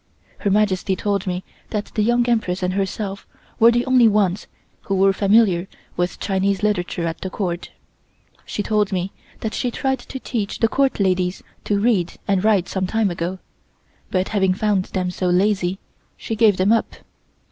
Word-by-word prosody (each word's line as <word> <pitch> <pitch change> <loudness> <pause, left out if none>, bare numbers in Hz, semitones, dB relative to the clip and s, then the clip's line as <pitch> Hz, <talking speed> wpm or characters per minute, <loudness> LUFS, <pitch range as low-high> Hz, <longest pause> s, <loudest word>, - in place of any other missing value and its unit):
Her 200 - 0
Majesty 195 -2 +2
told 200 0 -1
me 180 0 -2 0.3
that 210 -2 -3
the 215 - 0
Young 240 +2 +2
Empress 210 -6 0
and 180 0 0
herself 195 0 -3 0.3
were 230 - +8
the 240 +1 +2
only 255 -3 +5
ones 205 -3 +1 0.4
who 195 - +2
were 195 +1 +4
familiar 195 -3 +3 0.3
with 175 0 -2
Chinese 195 0 0
literature 180 -4 0
at 165 -1 -4
the 190 - -3
Court. 180 -3 -3 0.7
She 205 - -4
told 210 -1 +1
me 185 0 -2 0.3
that 220 - -3
she 250 - -1
tried 265 +2 -1
to 265 - -8
teach 220 -6 -3
the 225 - +3
Court 270 +2 +1
ladies 185 -1 0 0.2
to 205 -1 +1
read 200 -6 +1
and 195 -2 +1
write 205 -5 +3
some 190 -1 -2
time 220 -1 +1
ago, 175 +2 -3 0.7
but 185 0 0
having 190 -3 +2
found 200 -2 +1
them 180 -1 -2
so 180 0 -2
lazy 185 0 +1 0.4
she 225 - -4
gave 215 -3 +4
them 190 +3 +3
up. 230 - +1
200 Hz, 175 wpm, -21 LUFS, 185-215 Hz, 0.7 s, were